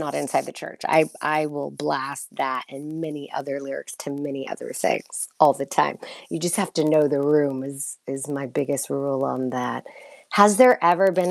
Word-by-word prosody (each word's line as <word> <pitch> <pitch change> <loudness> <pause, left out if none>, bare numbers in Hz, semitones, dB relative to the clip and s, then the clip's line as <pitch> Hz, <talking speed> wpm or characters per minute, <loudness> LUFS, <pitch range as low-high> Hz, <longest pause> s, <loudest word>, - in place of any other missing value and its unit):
not - - -4
inside 75 - -1
the - - -9
church. - - -11
I 155 0 +6 0.2
I 155 0 +1
will 145 -1 -6
blast 140 -1 -4
that, 130 -1 -2
and 150 +4 -9
many 150 -3 -7
other 140 0 -5
lyrics 135 0 -8
to 145 - -6
many 140 -1 -6
other - - -8
things - - -2
all - - +8
the - - -5
time, - - 0 0.3
you 165 - -5
just 175 0 0
have 195 -4 -1
to 160 - +2
know 155 -1 +5
the 145 -1 0
room 140 -2 +2
is 140 +1 -7
is 135 +1 -5
my 140 -1 -4
biggest 140 +1 -2
rule 140 -1 -1
on 130 -1 -2
that. 125 -1 -4 0.5
Has 205 0 +7
there 255 -1 +8
ever 180 +3 +5
been 180 0 +1
145 Hz, 200 wpm, -23 LUFS, 135-155 Hz, 0.5 s, all